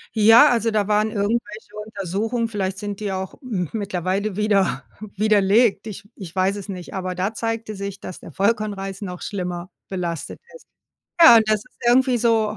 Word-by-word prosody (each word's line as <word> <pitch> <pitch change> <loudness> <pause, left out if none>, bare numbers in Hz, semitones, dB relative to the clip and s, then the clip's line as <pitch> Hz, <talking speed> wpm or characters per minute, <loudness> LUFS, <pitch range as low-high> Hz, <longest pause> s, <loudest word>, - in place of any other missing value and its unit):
Ja, 225 +7 +7
also 230 -1 +1
da 210 -2 0
waren 215 +1 +2
irgendwelche 210 0 -3
Untersuchungen, 220 +4 -2
vielleicht 195 -3 -3
sind 205 -1 -5
die 205 -2 -3
auch 190 0 -4
mittlerweile 195 - -2
wieder 205 -3 +1 0.3
widerlegt. 210 +2 +3
Ich 205 -1 -9
ich 185 -3 -10
weiß 190 +1 +1
es 205 -1 -7
nicht, 185 -2 -7
aber 185 -1 -3
da 190 +5 -2
zeigte 225 -1 -3
sich, 200 0 -6
dass 185 - -8
der - - -11
Vollkornreis 200 -2 -1
noch 180 -3 -6
schlimmer 180 -3 -4 0.2
belastet 175 -4 -4 0.2
ist. - - -15 0.6
Ja, 320 -8 +10
und 220 - +4
das 215 - +4
ist - - -26
irgendwie 255 +1 +4
so, 225 -2 +1
205 Hz, 165 wpm, -22 LUFS, 190-220 Hz, 0.6 s, Ja